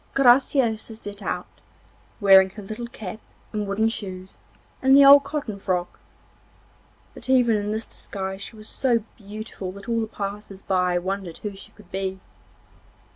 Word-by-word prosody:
Graciosa 245 Hz, -4 st, +3 dB
set 205 Hz, -1 st, -7 dB
out, 180 Hz, -2 st, -3 dB, 0.7 s
wearing 190 Hz, -2 st, +7 dB
her 210 Hz, +1 st, -10 dB
little 220 Hz, +4 st, -6 dB
cap 215 Hz, -4 st, -8 dB, 0.3 s
and 210 Hz, -1 st, -2 dB
wooden 205 Hz, +3 st, +1 dB
shoes 190 Hz, -4 st, -5 dB, 0.5 s
and 265 Hz, +1 st, +6 dB
the 280 Hz, -, +8 dB
old 280 Hz, +1 st, +9 dB
cotton 250 Hz, -10 st, -4 dB
frock, 180 Hz, -2 st, -2 dB, 1.1 s
but 255 Hz, -, -10 dB
even 245 Hz, -4 st, +4 dB
in 205 Hz, 0 st, -1 dB
this 220 Hz, +1 st, -2 dB
disguise 190 Hz, 0 st, -6 dB
she 225 Hz, -, -8 dB
was 215 Hz, 0 st, -8 dB
so 235 Hz, -3 st, +1 dB
beautiful 205 Hz, -2 st, -7 dB
that 200 Hz, +2 st, -11 dB
all 230 Hz, -1 st, +1 dB
the 220 Hz, -, -2 dB
passers 200 Hz, -1 st, -6 dB
by 180 Hz, -2 st, +1 dB
wondered 185 Hz, -1 st, -4 dB
who 210 Hz, -1 st, -3 dB
she 195 Hz, -, -13 dB
could 205 Hz, -4 st, -19 dB
be. 190 Hz, 0 st, -3 dB
210 Hz, 155 wpm, -24 LUFS, 190-230 Hz, 1.1 s, old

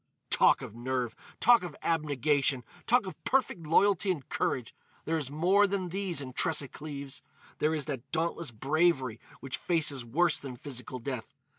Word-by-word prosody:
"Talk -, -, +5 dB
of -, -, -8 dB
nerve! 120 Hz, 0 st, -2 dB, 0.2 s
Talk 240 Hz, 0 st, +6 dB
of 175 Hz, -4 st, -6 dB
abnegation! 145 Hz, -4 st, +2 dB, 0.2 s
Talk 245 Hz, -2 st, +4 dB
of 185 Hz, -, -9 dB
perfect 220 Hz, -, 0 dB
loyalty 200 Hz, +4 st, +4 dB
and 160 Hz, -8 st, -1 dB
courage! 120 Hz, -4 st, -1 dB, 0.3 s
There 165 Hz, 0 st, 0 dB
is 140 Hz, -4 st, -4 dB
more 185 Hz, +8 st, +4 dB
than 190 Hz, -2 st, -2 dB
these 185 Hz, -4 st, -2 dB
in 130 Hz, -2 st, -7 dB
Tressa 145 Hz, -1 st, +1 dB
Cleves. 140 Hz, -2 st, -6 dB, 0.4 s
There 155 Hz, +1 st, +2 dB
is 150 Hz, -, -1 dB
that 135 Hz, -3 st, -5 dB
dauntless 165 Hz, -1 st, -1 dB
bravery 135 Hz, 0 st, +1 dB, 0.2 s
which 135 Hz, -1 st, -3 dB
faces 150 Hz, -7 st, +1 dB
worse 160 Hz, +10 st, +2 dB
than 135 Hz, -3 st, -7 dB
physical 130 Hz, 0 st, -6 dB
death. 125 Hz, -2 st, -5 dB
150 Hz, 160 wpm, -30 LUFS, 130-175 Hz, 0.4 s, Talk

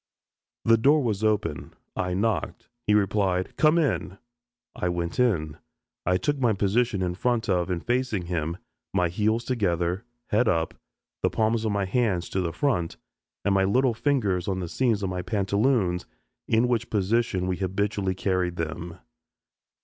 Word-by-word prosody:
The 115 Hz, 0 st, +5 dB
door 145 Hz, +5 st, +4 dB
was 110 Hz, -3 st, -1 dB
open. 105 Hz, -8 st, -1 dB, 0.2 s
I 90 Hz, 0 st, -1 dB
knocked. 100 Hz, -3 st, -1 dB, 0.2 s
He 105 Hz, -, +4 dB
replied, 95 Hz, -3 st, +1 dB
"Come 155 Hz, +2 st, +4 dB
in." 135 Hz, -, 0 dB, 0.6 s
I 90 Hz, -, -1 dB
went 85 Hz, +1 st, -3 dB
in. 80 Hz, -, +1 dB, 0.5 s
I 90 Hz, 0 st, +4 dB
took 145 Hz, +7 st, -1 dB
my 120 Hz, -4 st, +3 dB
position 100 Hz, 0 st, +1 dB
in 90 Hz, -1 st, -1 dB
front 115 Hz, +3 st, 0 dB
of 90 Hz, -2 st, +1 dB
and 90 Hz, -2 st, -3 dB
facing 120 Hz, -7 st, 0 dB
him, 85 Hz, -1 st, -2 dB, 0.4 s
my 90 Hz, -3 st, +3 dB
heels 110 Hz, +6 st, +1 dB
together, 90 Hz, -6 st, 0 dB, 0.3 s
head 110 Hz, +3 st, +3 dB
up, 80 Hz, -5 st, +1 dB, 0.5 s
the -, -, +2 dB
palms 110 Hz, 0 st, +1 dB
of 110 Hz, -, +1 dB
my 100 Hz, -1 st, 0 dB
hands 95 Hz, -4 st, 0 dB
to 95 Hz, -, -1 dB
the 85 Hz, -2 st, -1 dB
front, 90 Hz, -, -1 dB, 0.5 s
and 100 Hz, -, +3 dB
my 95 Hz, 0 st, +3 dB
little 125 Hz, +6 st, +3 dB
fingers 110 Hz, -9 st, 0 dB
on 95 Hz, -1 st, -1 dB
the 90 Hz, -, -3 dB
seams 115 Hz, -3 st, +1 dB
of 95 Hz, -, -1 dB
my 90 Hz, 0 st, -2 dB
pantaloons, 100 Hz, -1 st, +1 dB, 0.4 s
in 115 Hz, +2 st, +3 dB
which 120 Hz, -1 st, 0 dB
position 105 Hz, -2 st, +1 dB
we 90 Hz, -1 st, -1 dB
habitually 95 Hz, 0 st, -1 dB
carried 90 Hz, -2 st, 0 dB
them. 85 Hz, +1 st, -5 dB
100 Hz, 160 wpm, -26 LUFS, 90-115 Hz, 0.6 s, The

